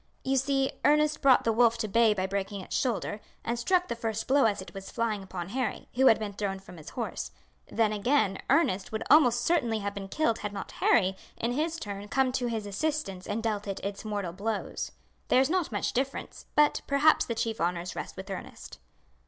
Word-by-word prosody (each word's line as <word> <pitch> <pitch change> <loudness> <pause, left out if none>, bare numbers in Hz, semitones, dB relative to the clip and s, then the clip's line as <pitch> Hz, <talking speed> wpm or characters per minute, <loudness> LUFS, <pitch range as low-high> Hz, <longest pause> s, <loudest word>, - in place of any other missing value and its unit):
"You 265 +1 +1
see 270 0 +1
Ernest 300 0 +3
brought 270 -2 +6
the 225 - +2
wolf 230 0 +4
to 215 - -2
bay 220 +1 +4
by 185 -1 -1
breaking 195 +1 -3
its - - -6
shoulder, 220 -4 -1 0.2
and 235 +1 -1
struck 360 +8 +2
the - - -3
first 225 -2 -3
blow 275 0 +4
as 210 -2 +1
it 190 - -9
was 195 -1 -8
flying 225 -3 -1
upon 185 -2 -6
Harry, 245 0 -3
who 265 +2 +4
had 225 - +7
been 210 -2 -4
thrown 200 -1 -2
from 190 -2 -13
his 155 - -10
horse. - - -4 0.4
Then, 220 -1 +1
again, 210 -2 +1
Ernest 195 - +2
would 220 0 -2
almost 245 -6 +6
certainly 240 -10 +2
have 200 -1 -3
been 195 -1 -6
killed 230 -1 0
had 205 -1 -4
not 195 - -6
Harry 190 -5 +3 0.2
in 235 - -1
his 315 +6 -1
turn 205 -6 -6
come 265 +3 +2
to 250 -1 -1
his 225 -3 -3
assistance 205 -4 -2
and 220 +2 -2
dealt 210 -2 -1
it 195 - -3
its 200 0 -4
mortal 205 -5 -3
blows. 210 +3 -3 0.4
There - - +4
is 270 +3 +2
not 365 -6 0
much 205 - -1
difference, 270 +2 -3
but 300 0 +4
perhaps 285 +3 +4
the 230 - -3
chief 225 -2 -2
honours 175 +1 -1
rest - - -6
with 190 +1 -7
Ernest." 65 - -8
220 Hz, 210 wpm, -29 LUFS, 200-265 Hz, 0.4 s, had